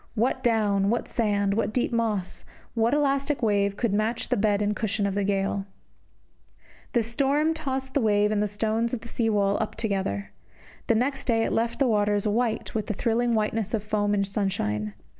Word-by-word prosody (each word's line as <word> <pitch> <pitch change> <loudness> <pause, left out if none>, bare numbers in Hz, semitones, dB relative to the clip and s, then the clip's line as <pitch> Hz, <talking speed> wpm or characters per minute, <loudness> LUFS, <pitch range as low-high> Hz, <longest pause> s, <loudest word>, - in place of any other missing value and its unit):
What 250 +3 0
down, 205 -4 +2
what 235 +2 0
sand, 205 -3 0
what 220 +1 0
deep 245 +2 0
moss, 215 -6 -1 0.3
what 230 +4 +2
elastic 280 -1 0
wave 200 -2 +1
could 230 -5 0
match 215 +3 0
the - - +2
bed 205 -1 +2
and 210 0 0
cushion 210 -1 -1
of 200 - 0
the 200 +1 0
gale? 195 0 -1 1.3
This 235 -4 +2
storm 280 +6 +1
tossed 265 -4 -3
the 280 - +2
wave 210 -1 +3
and 210 -1 +1
the 210 - +1
stones 220 +3 -1
of 225 - -8
the 235 - -10
sea 230 -1 0
wall 200 -2 +2
up 220 - -3
together. 190 - -2 0.6
The 230 - +3
next 270 +4 0
day 225 -3 +2
it - - -1
left 230 +1 0
the 275 - +2
waters 205 -2 +1
white 225 +1 -1
with 220 -2 -2
the 215 - -2
thrilling 235 +2 +1
whiteness 215 0 0
of 210 - -3
foam 205 -1 0
in 200 - +1
sunshine. 105 - -2
215 Hz, 195 wpm, -26 LUFS, 205-235 Hz, 1.3 s, wave